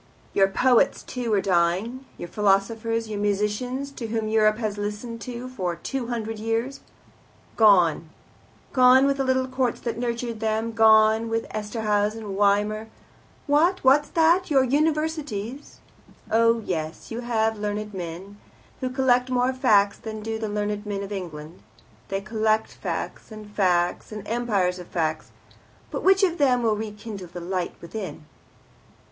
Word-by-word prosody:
Your 195 Hz, -1 st, +4 dB
poets 250 Hz, +6 st, +3 dB
too 245 Hz, -3 st, -4 dB
are 200 Hz, -, +3 dB
dying, 190 Hz, +8 st, 0 dB
your 175 Hz, -, -6 dB
philosophers, 220 Hz, +4 st, 0 dB
your 210 Hz, -1 st, -4 dB
musicians, 210 Hz, +7 st, -1 dB
to 240 Hz, -4 st, -6 dB
whom 220 Hz, -1 st, -2 dB
Europe 215 Hz, -1 st, +3 dB
has 215 Hz, -3 st, -3 dB
listened 215 Hz, +3 st, -5 dB, 0.3 s
for 180 Hz, -5 st, -2 dB
two 245 Hz, -, -4 dB
hundred 225 Hz, -2 st, -4 dB
years. 225 Hz, +5 st, -2 dB, 0.8 s
Gone. 180 Hz, -7 st, +4 dB, 0.6 s
Gone 255 Hz, +1 st, +6 dB
with 275 Hz, 0 st, +1 dB
the 270 Hz, -, 0 dB
little 260 Hz, 0 st, +1 dB
courts 255 Hz, -2 st, -1 dB
that 235 Hz, -1 st, -3 dB
nurtured 235 Hz, -1 st, -3 dB
them 220 Hz, +1 st, -1 dB
gone 220 Hz, 0 st, +5 dB
with 225 Hz, 0 st, -1 dB
Esterhaz 210 Hz, -1 st, -1 dB
and 210 Hz, -3 st, -6 dB
Weimar. 205 Hz, +2 st, +1 dB, 0.6 s
What? 320 Hz, +6 st, +2 dB
What's 275 Hz, +3 st, +4 dB
that? 340 Hz, +2 st, +3 dB
Your 270 Hz, -3 st, +4 dB
Universities? 295 Hz, -4 st, -2 dB, 0.5 s
Oh, 230 Hz, +1 st, +4 dB
yes, 160 Hz, -3 st, -4 dB
you 225 Hz, -, -4 dB
have 220 Hz, -2 st, 0 dB
learned 210 Hz, 0 st, -3 dB
men, 185 Hz, +3 st, -7 dB, 0.4 s
who 255 Hz, -, -2 dB
collect 255 Hz, -1 st, +2 dB
more 250 Hz, +1 st, +1 dB
facts 210 Hz, -6 st, +3 dB
than 220 Hz, -1 st, -7 dB
do 225 Hz, 0 st, -3 dB
the 220 Hz, -1 st, -3 dB
learned 205 Hz, 0 st, -2 dB
men 200 Hz, -2 st, -4 dB
of 200 Hz, -, -8 dB
England. 170 Hz, -4 st, -7 dB, 0.5 s
They 195 Hz, 0 st, -2 dB
collect 215 Hz, +1 st, 0 dB
facts, -, -, -5 dB
and 215 Hz, -1 st, -9 dB
facts, 180 Hz, -4 st, 0 dB
and 210 Hz, -1 st, -7 dB
empires 205 Hz, -6 st, 0 dB
of 175 Hz, -, -9 dB
facts. 160 Hz, -2 st, -2 dB, 0.6 s
But -, -, -3 dB
which 385 Hz, +1 st, +4 dB
of 350 Hz, -3 st, +2 dB
them 250 Hz, -4 st, +3 dB
will 220 Hz, -2 st, +2 dB
rekindle 210 Hz, -2 st, -7 dB
the 175 Hz, +1 st, -8 dB
light 180 Hz, 0 st, -3 dB
within?" 185 Hz, -3 st, -7 dB
220 Hz, 150 wpm, -24 LUFS, 205-245 Hz, 0.8 s, Gone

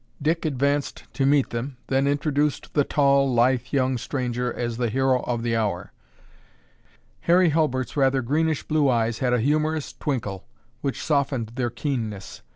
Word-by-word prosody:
Dick 160 Hz, +3 st, 0 dB
advanced 140 Hz, 0 st, -1 dB
to 135 Hz, -1 st, +1 dB
meet 140 Hz, -1 st, +3 dB
them, 125 Hz, +3 st, -4 dB
then 135 Hz, +1 st, +1 dB
introduced 145 Hz, 0 st, 0 dB
the 145 Hz, -, +3 dB
tall, 140 Hz, -2 st, +3 dB
lithe 125 Hz, +1 st, +2 dB
young 130 Hz, -2 st, +1 dB
stranger 125 Hz, -1 st, -2 dB
as 120 Hz, -1 st, -3 dB
the 120 Hz, -1 st, 0 dB
"hero 130 Hz, +2 st, +2 dB
of 120 Hz, -2 st, -1 dB
the 115 Hz, -1 st, 0 dB
hour." 105 Hz, -6 st, -2 dB, 1.4 s
Harry 175 Hz, 0 st, +6 dB
Hulbert's 145 Hz, -5 st, 0 dB
rather 135 Hz, -2 st, +2 dB
greenish 155 Hz, +5 st, 0 dB
blue 150 Hz, -3 st, +2 dB
eyes 115 Hz, -2 st, +1 dB
had 130 Hz, -2 st, +1 dB
a 125 Hz, -, +2 dB
humorous 155 Hz, +4 st, 0 dB
twinkle 115 Hz, -, -4 dB, 0.3 s
which 135 Hz, -2 st, -3 dB
softened 140 Hz, -6 st, 0 dB
their 120 Hz, -1 st, -1 dB
keenness. 110 Hz, -7 st, -4 dB
135 Hz, 155 wpm, -24 LUFS, 120-145 Hz, 1.4 s, Harry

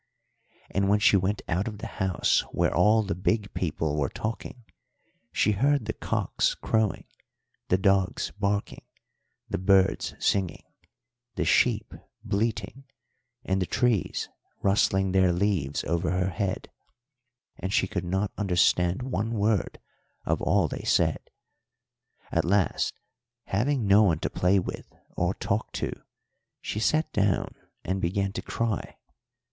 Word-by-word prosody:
And 100 Hz, 0 st, +1 dB
when 105 Hz, -, +5 dB
she 105 Hz, -1 st, +4 dB
went 100 Hz, +2 st, 0 dB
out 90 Hz, +6 st, 0 dB
of 105 Hz, -2 st, -5 dB
the 110 Hz, -, -7 dB, 0.2 s
house 95 Hz, -2 st, +2 dB
where -, -, +1 dB
all 110 Hz, +1 st, +4 dB
the 100 Hz, -, -2 dB
big 100 Hz, +4 st, -1 dB
people 80 Hz, -3 st, -1 dB
were 70 Hz, -, 0 dB
talking, 115 Hz, +2 st, -5 dB, 0.7 s
she 105 Hz, -, +2 dB
heard 135 Hz, +4 st, +2 dB
the 110 Hz, -, -2 dB
cocks -, -, -1 dB
crowing, 110 Hz, -2 st, 0 dB, 0.6 s
the 90 Hz, -, +3 dB
dogs 95 Hz, -1 st, +1 dB
barking, 100 Hz, 0 st, -1 dB, 0.7 s
the -, -, -3 dB
birds 95 Hz, 0 st, +2 dB
singing, 95 Hz, -4 st, 0 dB, 0.7 s
the -, -, -1 dB
sheep -, -, +2 dB, 0.3 s
bleating, 110 Hz, +5 st, -2 dB, 0.6 s
and 95 Hz, 0 st, 0 dB
the 90 Hz, -, -1 dB
trees 120 Hz, -6 st, 0 dB, 0.4 s
rustling 95 Hz, -1 st, +2 dB
their 95 Hz, -1 st, +4 dB
leaves 85 Hz, -6 st, 0 dB
over 85 Hz, 0 st, -1 dB
her 90 Hz, +1 st, 0 dB
head, 95 Hz, +3 st, -3 dB, 0.9 s
and 95 Hz, -, -3 dB
she -, -, +3 dB
could 90 Hz, -, -3 dB
not 95 Hz, +3 st, -1 dB
understand 90 Hz, 0 st, +2 dB
one 115 Hz, -3 st, -2 dB
word 105 Hz, -3 st, 0 dB, 0.5 s
of -, -, 0 dB
all -, -, +2 dB
they -, -, -5 dB
said. -, -, +1 dB, 1.0 s
At -, -, +2 dB
last, 95 Hz, +2 st, +1 dB, 0.5 s
having 120 Hz, +4 st, 0 dB
no 100 Hz, +2 st, +6 dB
one 90 Hz, -7 st, +3 dB
to -, -, -2 dB
play 90 Hz, +2 st, +2 dB
with 95 Hz, -, -4 dB, 0.2 s
or -, -, 0 dB
talk -, -, -2 dB
to, -, -, -2 dB, 0.7 s
she 105 Hz, -, -4 dB
sat 155 Hz, +8 st, +1 dB
down 100 Hz, -2 st, +1 dB, 0.3 s
and 95 Hz, +1 st, -1 dB
began 95 Hz, +3 st, -1 dB
to -, -, -4 dB
cry. 115 Hz, -3 st, -3 dB
100 Hz, 135 wpm, -27 LUFS, 95-105 Hz, 1.0 s, no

